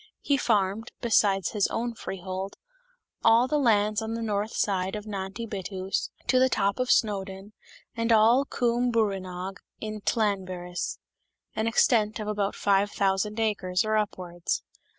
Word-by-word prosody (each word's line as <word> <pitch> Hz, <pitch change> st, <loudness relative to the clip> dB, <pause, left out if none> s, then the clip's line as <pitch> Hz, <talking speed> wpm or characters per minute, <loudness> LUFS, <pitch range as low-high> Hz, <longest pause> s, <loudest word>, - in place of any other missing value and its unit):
He 285 Hz, -, +2 dB
farmed, 215 Hz, -3 st, 0 dB
besides 200 Hz, -6 st, +2 dB
his 210 Hz, -3 st, +1 dB
own 235 Hz, +1 st, -2 dB
freehold, 190 Hz, -2 st, -5 dB, 0.7 s
all 230 Hz, +2 st, +5 dB
the 300 Hz, +2 st, +1 dB
lands 215 Hz, -4 st, +3 dB
on 220 Hz, +1 st, -3 dB
the 230 Hz, -, -3 dB
north 210 Hz, 0 st, -2 dB
side 190 Hz, -1 st, 0 dB
of 210 Hz, 0 st, -6 dB
Nant 195 Hz, -1 st, -5 dB
y 230 Hz, -, -4 dB
Bettws 190 Hz, -2 st, -3 dB, 0.2 s
to 255 Hz, -, +3 dB
the 260 Hz, 0 st, +4 dB
top 200 Hz, -2 st, 0 dB
of 255 Hz, 0 st, 0 dB
Snowdon, 195 Hz, -2 st, 0 dB, 0.4 s
and 230 Hz, 0 st, 0 dB
all 225 Hz, +4 st, +6 dB
Cwm 245 Hz, -2 st, 0 dB
brwynog 195 Hz, -4 st, -1 dB, 0.2 s
in 215 Hz, -1 st, -5 dB
Llanberis, 185 Hz, -5 st, -1 dB, 0.6 s
an 220 Hz, +1 st, 0 dB
extent 225 Hz, -2 st, +3 dB
of 210 Hz, -, -4 dB
about 205 Hz, -1 st, -1 dB
five 200 Hz, 0 st, +2 dB
thousand 200 Hz, +2 st, 0 dB
acres 200 Hz, -4 st, 0 dB
or 215 Hz, 0 st, +1 dB
upwards. 180 Hz, -5 st, -2 dB
210 Hz, 150 wpm, -27 LUFS, 195-225 Hz, 0.7 s, all